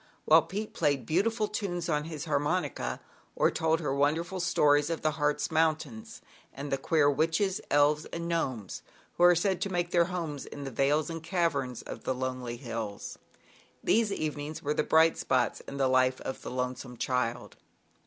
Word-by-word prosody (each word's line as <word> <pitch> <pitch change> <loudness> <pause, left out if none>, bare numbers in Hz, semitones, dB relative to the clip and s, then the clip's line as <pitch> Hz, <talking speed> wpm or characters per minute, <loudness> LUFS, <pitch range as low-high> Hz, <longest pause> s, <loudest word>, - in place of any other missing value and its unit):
while - - +7
Pete 210 +2 -5
played 140 -4 +1
beautiful 215 - +1
tunes 175 -6 -3
on 150 -2 0
his 160 -1 -6
harmonica, 145 - -1 0.4
or - - +3
told 160 0 +1
her 145 -4 -1
wonderful 160 +6 0
stories 150 -4 +3
of 165 - -3
the 155 - +3
Hartz 150 +1 0
Mountains, 155 -8 -1 0.3
and 140 +2 -6
the 135 - +2
queer 155 -3 +3
Witches, 165 +7 +1
Elves 145 +1 +3
and 170 0 -5
Gnomes, 130 - -2 0.4
who 175 - +3
are 175 0 +7
said 190 +2 0
to 195 - -1
make 175 -1 -1
their 170 -1 +4
homes 165 -6 -4
in 145 - -8
the 135 - -5
vales 145 +6 +1
and 165 0 -5
caverns 160 - -1
of - - -8
the 130 - -1
lonely 130 -2 -4
hills. 115 -4 -6 0.6
These 220 -1 +3
even 155 -6 -2
ings 150 +2 -6
were 150 0 0
the - - +1
bright 160 +1 +4
spots 130 -1 +1
in 140 - -6
the 135 -1 +2
life 130 0 +3
of 130 - -5
the - - -6
lonesome 125 0 -4
child. 125 -2 -2
150 Hz, 180 wpm, -29 LUFS, 130-170 Hz, 0.6 s, while